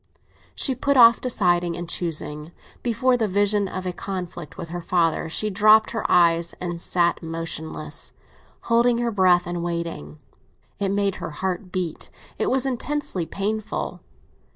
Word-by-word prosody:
She 270 - 0
put 280 +2 +1
off 235 -1 +8
deciding 175 -8 +1
and 175 0 -5
choosing; 155 -2 -3 0.3
before 250 +2 +2
the 225 -2 +1
vision 205 +1 +2
of 185 0 -5
a 180 - -2
conflict 180 -4 -6
with 165 - -7
her 175 +1 -5
father 165 -1 +1
she 210 +6 -1
dropped 215 +2 +5
her 225 - -2
eyes 170 -1 +4
and 175 -1 -5
sat 175 -1 +1
motionless, 160 -2 -4 0.5
holding 235 +1 +3
her 240 0 0
breath 185 -3 +4
and 175 -1 -3
waiting. 170 - -4 0.6
It 200 -1 0
made 200 -1 0
her - - -5
heart 180 +4 -4
beat, 180 -4 -3 0.3
it - - +1
was 265 0 +2
intensely 270 - -2
painful. 210 +4 -3
185 Hz, 150 wpm, -23 LUFS, 170-215 Hz, 0.6 s, off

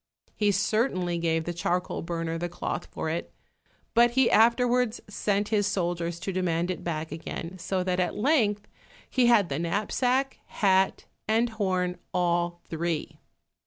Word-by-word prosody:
He 210 -1 +2
certainly 195 -3 0
gave 165 -1 +1
the 175 - -3
charcoal 175 +2 -1
burner 165 -1 -3
the 175 +1 -2
cloth - - -4
for - - -4
it, 165 +2 -3 0.6
but 240 +1 +6
he 265 -2 +5
afterwards 240 +1 +3
sent 205 0 -1
his 205 -2 +2
soldiers 175 -3 -1
to 195 - -3
demand 175 -1 0
it 185 - -6
back 160 -2 -3
again, 165 +2 -6
so 185 +1 -1
that 180 0 0
at 180 - 0
length 210 -5 +2 0.4
he 250 -2 +2
had 220 -6 +5
the 140 +2 -2
knapsack, 245 +10 0
hat 190 -2 +2 0.2
and 225 +2 +2
horn, 185 -5 -1 0.2
all 175 -1 +1
three. 165 -1 -3
185 Hz, 150 wpm, -27 LUFS, 170-215 Hz, 0.6 s, but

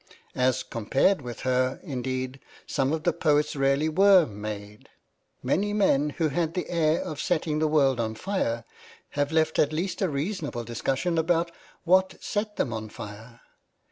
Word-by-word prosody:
As 130 0 +1
compared 135 - +1
with 120 -2 -7
her, 130 0 +1
indeed, 130 -2 -3 0.3
some 135 -1 0
of 160 0 -2
the 175 - +2
poets 150 -1 +1
really 140 +2 +2
were 190 +2 +6
made. 105 -1 -8 0.5
Many 205 +3 +1
men 150 -8 +3
who 160 -2 +2
had 165 +2 -1
the 180 - -2
air 165 -1 +2
of 150 - -5
setting 155 -3 0
the 155 - +2
world 140 -5 +3
on 110 -1 -1
fire 115 - -2 0.4
have 145 0 -1
left 160 -1 +2
at 150 - +3
least 175 +4 -2
a 190 - +2
reasonable 145 - -3
discussion 135 +9 -1
about 170 +1 +1 0.3
what 185 +2 +3
set 210 0 -3
them 120 - -1
on 110 -1 -5
fire. 115 +2 -10
150 Hz, 160 wpm, -26 LUFS, 125-170 Hz, 0.5 s, were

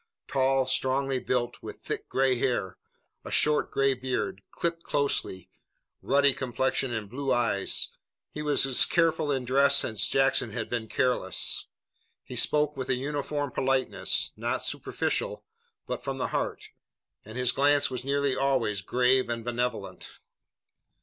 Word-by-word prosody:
Tall, 135 -1 +2
strongly 130 +1 0
built, 125 -1 -2
with - - -9
thick - - -5
gray 130 -1 +2
hair, 120 -7 -2 0.4
a - - -8
short 150 0 +2
gray 135 0 +2
beard, 130 -6 -3
clipped 170 -1 -3
closely, 140 - -1 0.5
ruddy 140 0 +3
complexion 130 0 -1
and 110 -3 -4
blue 135 +5 -3
eyes, 110 -5 +1 0.4
he 150 - -6
was 150 -2 +3
as 135 -2 +6
careful 165 -3 +1
in 130 -2 -1
dress 140 +2 +4
as 110 -4 +1
Jackson 135 0 +1
had 115 -3 -5
been 115 -2 -2
careless. 125 -7 +1 0.6
He - - -9
spoke 150 0 +2
with 130 -1 -5
a 130 - +3
uniform 145 +1 -3
politeness, 135 0 +1
not - - -2
superficial, - - -1 0.4
but - - -5
from 135 0 -4
the 125 - -2
heart, - - -3 0.5
and 110 +4 -10
his 125 -1 +2
glance 145 0 +2
was 125 -1 -4
nearly 140 0 0
always 130 -8 0
grave 125 +4 +2
and 115 -1 -4
benevolent. 120 0 -4
130 Hz, 145 wpm, -27 LUFS, 125-140 Hz, 0.6 s, as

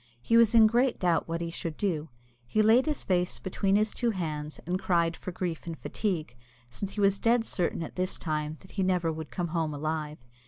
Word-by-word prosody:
He 230 - +1
was 230 0 +6
in 225 -1 +8
great 240 +3 +3
doubt 175 -3 +1
what 165 0 -3
he 170 0 -3
should 165 -2 -5
do. 165 -6 -1 0.4
He 215 - +2
laid 235 +6 +5
his 300 -2 -1
face 180 -1 0
between 195 +1 0
his 215 +1 +2
two 240 - 0
hands, 155 -7 -4
and 180 +2 -1
cried 170 -3 +2
for 185 - -6
grief 175 -2 -4
and 165 -1 -4
fatigue, 170 - -3 0.4
since 195 +9 -5
he - - -5
was 195 0 +3
dead 235 0 +3
certain 170 -4 -1
at 160 - -8
this 185 0 -1
time 155 -1 -3
that 190 - -15
he 200 - -2
never 180 -3 +1
would 160 -1 -6
come 175 -2 -3
home 160 -2 -1
alive. 155 0 -3
180 Hz, 220 wpm, -29 LUFS, 160-205 Hz, 0.4 s, in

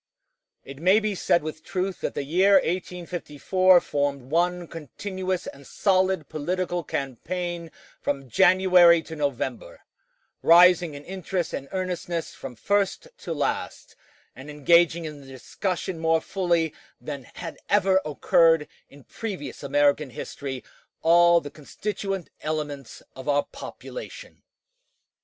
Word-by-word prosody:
It 135 0 -10
may 190 +5 +5
be 215 -1 -1
said 175 -3 +1
with 155 0 -6
truth 190 0 -3
that - - -3
the - - -2
year 185 +8 +3
1854 180 0 +2
formed 140 -2 -2
one 175 +1 +1
continuous 185 - -4
and 140 0 -10
solid 190 -5 +1
political 175 +3 -2
campaign 170 +6 -4 0.3
from 135 -2 -2
January 180 - +5
to 160 - -8
November, 150 - -3 0.6
rising 175 -2 +6
in 145 - -10
interest 185 -1 -3
and 135 - -5
earnestness 180 -3 -3
from 125 - -9
first 200 - 0
to - - -7
last, - - -3 0.4
and 135 +3 -11
engaging 170 +3 +3
in 150 -2 -7
the 135 - -15
discussion 170 +7 -4
more 160 0 +2
fully 170 -4 0 0.3
than 140 -4 -7
had 165 - -7
ever 195 -2 +3
occurred 160 +1 +3 0.2
in 140 -1 -16
previous 200 - -6
American 145 0 +2
history 130 +2 -6 0.4
all 170 +1 +6
the 145 - -8
constituent 195 +4 -5
elements 150 -4 -5
of 130 +2 -6
our 145 0 +3
population. - - -10
170 Hz, 125 wpm, -25 LUFS, 145-185 Hz, 0.6 s, rising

